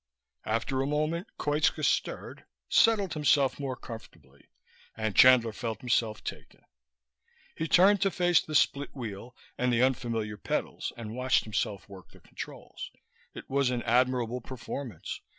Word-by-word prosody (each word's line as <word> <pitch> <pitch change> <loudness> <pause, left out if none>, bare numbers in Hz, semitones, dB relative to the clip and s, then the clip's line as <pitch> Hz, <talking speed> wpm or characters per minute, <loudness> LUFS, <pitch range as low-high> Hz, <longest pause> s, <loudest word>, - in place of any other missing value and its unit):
After 115 +4 0
a 135 - -1
moment 155 +6 -1
Koitska 150 +1 +1
stirred, - - -2 0.2
settled 210 -6 +4
himself 145 -3 +2
more 135 -2 -3
comfortably, 115 -3 -12 0.5
and 110 -3 -2
Chandler 125 -3 +7
felt 110 -1 -4
himself 115 -3 0
taken. - - -8 0.9
He 160 - -2
turned 195 +4 +5
to 195 - +3
face 175 -2 +3
the 155 - -6
split 140 0 +2
wheel 120 -1 -7 0.2
and 125 0 +2
the 120 +1 +3
unfamiliar 115 -5 -1
pedals - - -3
and 110 -2 -7
watched 130 +1 +2
himself 105 -2 -3
work 95 -3 -13
the - - -18
controls. - - -9 0.5
It - - -9
was 140 -1 +1
an 125 -1 -2
admirable 125 0 +1
performance. 130 0 -7
125 Hz, 140 wpm, -29 LUFS, 115-145 Hz, 0.9 s, Chandler